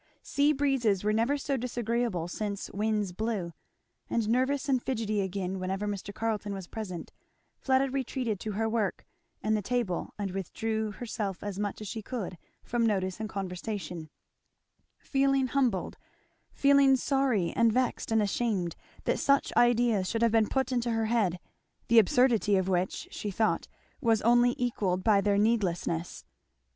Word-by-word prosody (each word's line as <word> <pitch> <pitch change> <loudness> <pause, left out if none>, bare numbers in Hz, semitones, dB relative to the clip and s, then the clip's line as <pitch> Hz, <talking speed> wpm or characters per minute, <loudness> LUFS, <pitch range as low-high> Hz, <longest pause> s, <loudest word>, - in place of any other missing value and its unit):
Sea 285 +1 +2
breezes 265 -9 +1
were 210 +1 +2
never 230 +6 +2
so 275 0 -1
disagreeable 235 -6 -1
since 200 +2 -4
winds 210 -1 0
blew; 195 -3 -3 0.6
and 230 -2 0
nervous 260 +5 +1
and 260 -3 +2
fidgety 220 -5 -1
again 190 0 -3
whenever 190 +2 -2
Mr. 205 -1 -4
Carleton 210 -2 -2
was 190 -2 -6
present, 185 -4 -6 0.5
Fleda 265 0 +2
retreated 255 -5 -2
to 215 +1 -4
her 220 +2 0
work 220 -4 -1 0.4
and 215 +1 +2
the 210 - 0
table 220 -4 -2
and 200 -2 -3
withdrew 220 +4 -2
herself 210 -5 -4
as 205 -1 -4
much 205 0 -3
as 210 - -6
she 220 +2 -4
could 200 -6 -5 0.2
from 240 -1 0
notice 190 -4 0
and 220 -1 -4
conversation; 180 -4 -5 0.9
feeling 275 -1 +1
humbled, 250 -8 0 0.5
feeling 280 -1 +5
sorry 260 - +1
and 230 -1 +4
vexed 250 0 0
and 220 -1 +3
ashamed, 200 -4 -1 0.3
that - - 0
such 280 0 +2
ideas 235 -5 +3
should 230 0 0
have 230 - +4
been 220 -1 +3
put 265 -1 0
into 240 -1 0
her 225 -1 +1
head, 215 -6 +1 0.5
the 235 0 +8
absurdity 225 -1 +3
of 190 -1 +1
which, 185 -1 -1
she 210 - -4
thought, 215 +2 0 0.3
was 225 -4 +2
only 240 +2 +4
equalled 195 -7 -1
by 210 -3 +4
their 200 0 +2
needlessness. 185 -6 0
220 Hz, 155 wpm, -29 LUFS, 195-245 Hz, 0.9 s, the